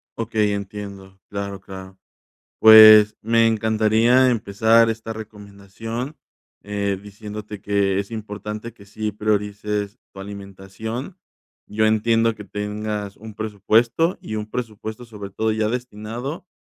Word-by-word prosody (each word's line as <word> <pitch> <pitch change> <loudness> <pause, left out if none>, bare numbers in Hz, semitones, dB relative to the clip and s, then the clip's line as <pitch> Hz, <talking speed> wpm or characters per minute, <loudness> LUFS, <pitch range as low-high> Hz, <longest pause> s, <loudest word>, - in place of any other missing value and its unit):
Okey, 110 -2 0
entiendo, 100 -1 -7
claro 100 -1 -5
claro, 95 -1 -11 0.6
pues, 110 -1 +9
me 115 +1 +3
encantaría 110 +3 +3
empezar 115 +1 +3
esta 115 0 -4
recomendación, 110 +4 -8 0.5
eh, 100 -1 -2
diciéndote 105 0 -8
que 100 -1 +1
es 100 0 -4
importante 105 +1 -6
que 100 - -17
sí 110 +2 -4
priorices 105 0 -2
tu 95 - -10
alimentación. 100 - -7 0.5
Yo 110 +1 +1
entiendo 115 +1 +2
que 105 - -10
tengas 105 0 -4
un 110 0 -11
presupuesto, 110 - +1
y 110 - -5
un 105 0 -4
presupuesto, 110 0 -6
sobre 105 -4 -9
todo 110 +3 -1
ya 110 0 0
destinado 125 +6 -5
105 Hz, 120 wpm, -22 LUFS, 100-110 Hz, 0.6 s, pues